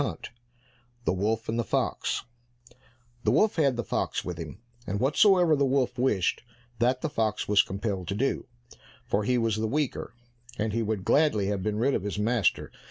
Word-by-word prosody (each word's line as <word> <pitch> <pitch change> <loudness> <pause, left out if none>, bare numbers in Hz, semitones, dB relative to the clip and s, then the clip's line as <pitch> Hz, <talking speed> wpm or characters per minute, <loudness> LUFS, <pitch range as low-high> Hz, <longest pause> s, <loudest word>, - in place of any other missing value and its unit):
73 135 - -4 0.7
The - - +2
Wolf 110 +4 -1
and 115 +1 -1
the - - +1
Fox - - -1 1.0
The - - +2
wolf 215 -3 +3
had 140 -5 +3
the 120 - -1
fox - - -2
with 90 -2 -5
him, 80 -3 -7 0.3
and 100 +2 -2
whatsoever 170 - +4
the 140 - +1
wolf 130 -2 +1
wished, 105 -8 +1 0.4
that 125 +2 +2
the - - 0
fox 110 -7 -1
was 105 -1 +5
compelled 95 -2 -4
to 100 - -2
do, 135 +6 -1 0.6
for 100 +1 0
he 125 +1 +2
was 115 -2 +1
the 110 +1 0
weaker, 135 -2 -2 0.4
and 105 0 -1
he 115 - 0
would 105 -3 -2
gladly 145 -10 +3
have 100 -2 -1
been 105 +2 -1
rid 130 +5 +2
of - - 0
his 105 +1 -4
master. 110 0 +1
115 Hz, 185 wpm, -27 LUFS, 105-130 Hz, 1.0 s, was